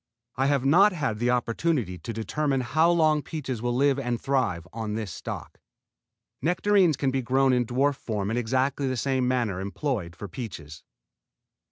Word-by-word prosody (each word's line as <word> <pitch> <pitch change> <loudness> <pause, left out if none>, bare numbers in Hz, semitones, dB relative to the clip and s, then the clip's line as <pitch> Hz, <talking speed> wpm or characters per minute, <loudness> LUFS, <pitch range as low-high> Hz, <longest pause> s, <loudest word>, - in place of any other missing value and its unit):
I 135 +2 +1
have 140 -2 +1
not 190 +8 +6
had 135 -10 -2
an 120 - +2
opportunity 120 - 0
to 80 - -6
determine 135 +5 -1
how 155 +7 +2
long 155 -3 +3
peaches 135 -7 -5
will 120 0 -1
live 140 +1 +3
and 120 -3 -2
thrive 115 -12 -1
on 110 -2 -3
this 110 -5 -4
stock. - - -7 0.8
Nectarines 180 -2 +3
can 135 -2 0
be 135 0 0
grown 130 +2 +2
in 125 -2 +1
dwarf 135 +3 +1
form 105 -2 -3
in - - -1
exactly 130 +4 0
the 130 -1 -1
same 130 +1 0
manner 120 -7 0
employed 100 - -3
for 100 - -7
peaches. 85 - -8
130 Hz, 170 wpm, -26 LUFS, 115-140 Hz, 0.8 s, not